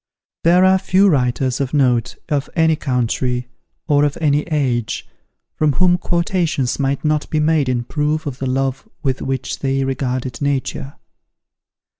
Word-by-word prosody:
There 180 +2 +5
are 190 0 +5
few 195 +1 +3
writers 130 -3 +1
of 135 +2 -2
note, 125 -5 +2
of 145 -2 -1
any 160 -1 +3
country, 125 -2 -1 0.4
or 145 -1 +3
of 145 -1 0
any 150 -2 +2
age, 130 -7 -1 0.5
from 150 -2 +1
whom 180 +2 +3
quotations 170 - 0
might 140 +1 -1
not 150 -1 0
be 155 - 0
made 150 -3 +2
in 120 -1 0
proof 150 +4 -1
of 135 -3 -5
the 135 - -2
love 135 +8 -2
with 135 -2 -1
which 135 -1 -3
they 135 0 0
regarded 130 -2 -3
Nature. 140 0 -2
140 Hz, 150 wpm, -19 LUFS, 130-155 Hz, 0.5 s, There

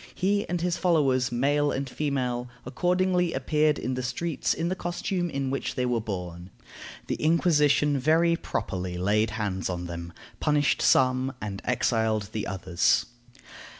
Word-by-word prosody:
He 200 +2 0
and 175 -1 -1
his 175 0 0
followers, 135 -8 +2
male 145 +4 +2
and 135 +1 -2
female, 125 -4 -2 0.2
accordingly 180 +4 +1
appeared 150 +3 +1
in 130 - -3
the 130 - -2
streets 130 +5 -2
in 165 - -1
the 185 - -1
costume 175 0 -2
in 135 -3 -2
which 135 - -3
they 125 -2 0
were 120 -2 0
born. 90 -4 -6 0.6
The - - -2
Inquisition 150 -3 +3
very 165 +5 +3
properly 90 - -4
laid 105 +4 +2
hands 95 -4 -2
on 90 -1 -3
them, 85 0 -6 0.3
punished 150 -2 +2
some, 130 0 +3
and 100 -2 -5
exiled 110 -4 0
the 110 -2 -3
others. 90 -3 +1
130 Hz, 150 wpm, -27 LUFS, 110-160 Hz, 0.6 s, Inquisition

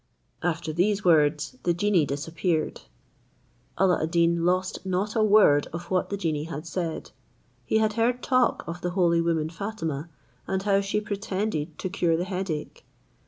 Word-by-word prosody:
After 165 -2 -2
these 195 +5 +1
words, 155 - +3
the 175 -1 +1
genie 180 -4 +2
disappeared. 160 +3 -2 1.0
Alla 185 -2 +3
ad 160 - -1
Deen 170 0 +2
lost 185 +1 0
not 190 +3 -1
a 225 - +3
word 205 -9 +5
of 170 +2 -7
what 185 -1 +1
the 200 - -2
genie 155 -5 -1
had 155 -1 -6
said. 165 -1 -4 0.5
He 220 - +2
had 215 -1 +2
heard 240 +2 0
talk 255 -2 +2
of 170 +2 -6
the 180 - -1
holy 170 -2 +3
woman 160 -2 0
Fatima, 165 -5 -4 0.4
and 190 0 -1
how 200 -1 +3
she 200 +1 -1
pretended 200 -5 -3
to - - -3
cure 175 -3 +1
the 175 - -1
headache. 185 -5 -4
175 Hz, 165 wpm, -26 LUFS, 165-200 Hz, 1.0 s, word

